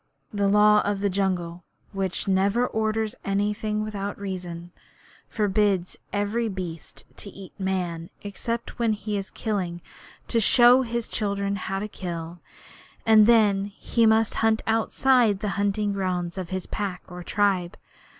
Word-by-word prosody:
The 200 -1 +1
Law 210 +1 +5
of 200 -1 -1
the 200 -1 +1
Jungle, 180 -3 -1 0.3
which 195 -2 -3
never 195 +5 +2
orders 220 -1 -1
anything 210 +2 -1
without 205 -2 -4
a - - -15
reason, 175 -3 -6 0.6
forbids 200 -3 +1 0.2
every 210 +3 -1
beast 180 -4 -7
to 200 - -8
eat 195 -1 -12
Man 180 -3 -2
except 230 +4 -5
when 230 -2 +2
he 210 0 -4
is 195 -1 -3
killing 185 -6 -3 0.5
to 230 - +1
show 240 +4 +6
his 235 -2 -3
children 200 -2 -1
how 195 0 -3
to 205 +2 -3
kill, 170 -3 -6 0.7
and 220 -1 +7
then 210 -4 +4
he 225 +3 0
must 220 0 +3
hunt 225 0 +2
outside 225 -1 +2
the 210 -1 -2
hunting 200 +1 0
grounds 180 -3 -2
of 185 -3 -5
his 185 -1 -3
pack 195 -4 -4
or 180 -1 -8
tribe. 190 -3 0
200 Hz, 145 wpm, -25 LUFS, 190-215 Hz, 0.7 s, and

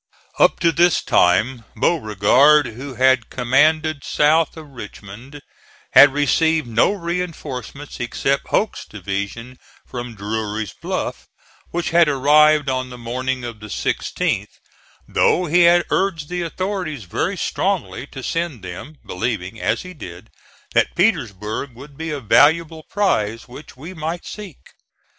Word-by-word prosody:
Up - - +4
to 170 -2 +4
this 170 +2 +3
time 115 +8 +2 0.2
Beauregard, 140 - +4
who 130 +3 -8
had 130 0 +3
commanded 150 +4 +2
south 155 +3 +2
of 155 -2 -10
Richmond, 120 +4 -11 0.5
had 145 +1 +8
received 155 +2 +2
no 115 - +3
reinforcements, 165 - -5
except 135 +3 -1
Hoke's 215 - 0
division 100 +5 -6 0.3
from 120 -2 -7
Drury's 105 +1 -4
Bluff,(*37) - - -4 0.4
which 175 +2 -3
had 170 -2 +5
arrived 150 +2 +4
on 130 -1 -1
the 125 - -9
morning 125 +2 -3
of 120 -3 -7
the 105 - -9
16th; - - -2 0.5
though 180 - +2
he 175 +2 +3
had 175 0 +4
urged 170 -6 0
the 180 0 -3
authorities 175 - -4
very 90 - -2
strongly - - -2
to - - -9
send 165 - -3
them, 95 - -8
believing, 110 0 -4
as - - 0
he 185 0 -9
did, 90 - -11 0.4
that - - +2
Petersburg 120 - -1
would 140 +3 -13
be 160 +3 -5
a 150 -2 -3
valuable 160 +7 +3
prize 115 - 0
which 130 +2 -12
we 160 +8 -9
might 165 +1 -5
seek. 205 -8 -10
140 Hz, 135 wpm, -20 LUFS, 115-160 Hz, 0.5 s, had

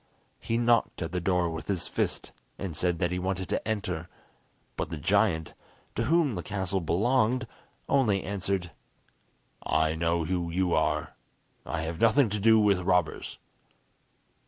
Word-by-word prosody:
He 115 - -1
knocked 120 -6 +2
at 85 - -5
the 90 0 -2
door 90 0 +1
with 80 0 -6
his 95 -4 -1
fist, - - -2 0.3
and 95 -5 -5
said 90 +1 0
that 85 -1 0
he 90 - -1
wanted 95 0 -2
to - - -2
enter; 90 -6 -2 0.7
but - - -3
the 80 - -4
giant, 80 +2 +1 0.4
to 115 - -1
whom 160 -1 +3
the 90 - -3
castle 95 0 -2
belonged, 120 +8 +2 0.4
only 110 -9 +2
answered: 95 -2 -2 0.9
"I 80 +1 +1
know 85 0 0
who 85 0 -1
you 90 +1 0
are. 80 - 0 0.5
I 85 - -2
have 80 +1 -4
nothing 115 +2 +5
to 105 +1 -2
do 110 +2 +5
with 100 -3 +3
robbers." 90 -3 0
95 Hz, 155 wpm, -28 LUFS, 85-105 Hz, 0.9 s, nothing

